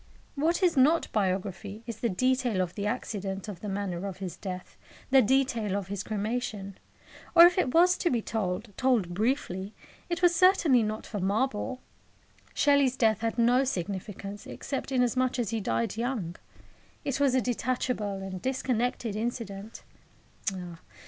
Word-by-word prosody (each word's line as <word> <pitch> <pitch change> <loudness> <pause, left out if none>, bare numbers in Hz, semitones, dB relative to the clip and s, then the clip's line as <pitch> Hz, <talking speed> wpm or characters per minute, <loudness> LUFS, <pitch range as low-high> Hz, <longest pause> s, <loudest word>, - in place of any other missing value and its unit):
What 330 +6 +1
is 355 -2 +4
not 295 +5 +4
biography 200 +1 -2
is 230 -3 -6
the 235 - 0
detail 255 +1 +1
of 180 -1 -1
the 205 0 -3
accident 200 -4 -3
of 200 -5 -7
the 210 - -5
manner 195 -2 -3
of 190 -2 -6
his 190 -2 -5
death, 185 -2 -7 0.4
the 265 0 +7
detail 235 -5 +1
of 195 -2 -5
his 200 -1 -3
cremation. 210 -2 -3 0.6
Or 335 - +11
if 350 - +5
it 365 -9 +1
was 355 +4 +5
to 345 - +2
be 245 - +1
told 200 -3 -3
told 235 -9 +2
briefly 205 -2 -1 0.3
it 345 +1 -2
was 350 -1 +5
certainly 345 -9 +5
not 215 0 -3
for 210 - -5
marble. 215 +5 -1 0.7
Shelley's 280 -3 +3
death 220 -3 +3
had 225 0 -1
no 245 +3 +4
significance, 200 -2 -4
except 275 -1 -5
inasmuch 255 0 +1
as 235 -3 -1
he 225 -1 -1
died 115 - -1
young. 230 -8 -2 0.7
It 275 -1 -1
was 275 -2 +3
a - - +5
detachable 240 -5 -1
and 185 -1 -6
disconnected 250 -3 -1
incident. 220 -2 -5
225 Hz, 155 wpm, -28 LUFS, 195-260 Hz, 0.7 s, Or